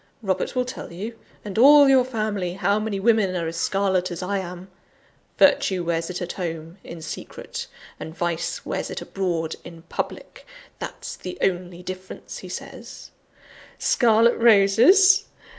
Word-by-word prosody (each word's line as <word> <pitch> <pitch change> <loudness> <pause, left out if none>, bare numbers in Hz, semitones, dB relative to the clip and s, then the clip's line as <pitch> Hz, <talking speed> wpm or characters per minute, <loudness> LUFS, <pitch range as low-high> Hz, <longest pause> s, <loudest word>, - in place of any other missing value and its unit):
Robert 190 +5 -1
will 250 0 +1
tell 250 - -8
you, 215 +7 -7 0.3
and 210 +1 -3
all 285 +3 +8
your 265 -2 +5
family, 215 -7 -3
how 200 +2 +1
many 215 -2 -3
women 210 -3 +2
are 170 -2 -2
as 165 +1 -4
scarlet 190 0 0
as 175 0 -5
I 200 +2 -1
am 180 0 -8 0.7
virtue 185 -2 +3
wears 165 0 -1
it 180 0 -4
at 175 - -4
home, 165 0 -6
in 165 -1 -9
secret; 155 - -7 0.3
and 160 +1 -8
vice 170 -1 -2
wears - - -3
it - - -5
abroad, 170 -4 -3
in 165 -1 -12
public: - - -6 0.3
that's - - -7
the 180 - -8
only 180 -1 -2
difference, 185 0 -8
he - - -10
says. - - -9 0.7
Scarlet 230 -1 +3
roses! 235 - +6
190 Hz, 150 wpm, -23 LUFS, 175-220 Hz, 0.7 s, all